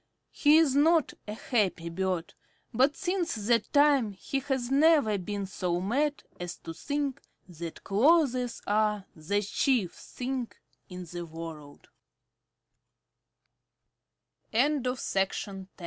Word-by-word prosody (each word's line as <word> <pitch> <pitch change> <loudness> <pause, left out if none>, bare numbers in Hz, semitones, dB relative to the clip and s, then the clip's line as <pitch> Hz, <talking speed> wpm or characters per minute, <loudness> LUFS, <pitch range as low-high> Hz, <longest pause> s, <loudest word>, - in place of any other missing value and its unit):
He 300 +1 +5
is 310 -5 +4
not 320 +1 +4
a 210 - -4
happy 200 -8 0
bird, 180 -1 -2 0.4
but 265 +5 +3
since 360 -4 -1
that 220 +1 +1
time 285 -7 +4
he 270 +8 -3
has 265 -2 -2
never 280 -8 +4
been 200 +2 -4
so 180 -2 -2
mad 280 +10 0 0.2
as 175 -1 -5
to 165 - -7
think 285 - -3 0.3
that 170 -2 -8
clothes 250 +1 +2
are 210 -1 +1
the 200 +6 -1
chief 210 -2 +1
thing 255 -1 -5 0.4
in 180 -1 -7
the 175 +1 -6
worl 160 -3 -9
220 Hz, 105 wpm, -29 LUFS, 185-280 Hz, 0.4 s, He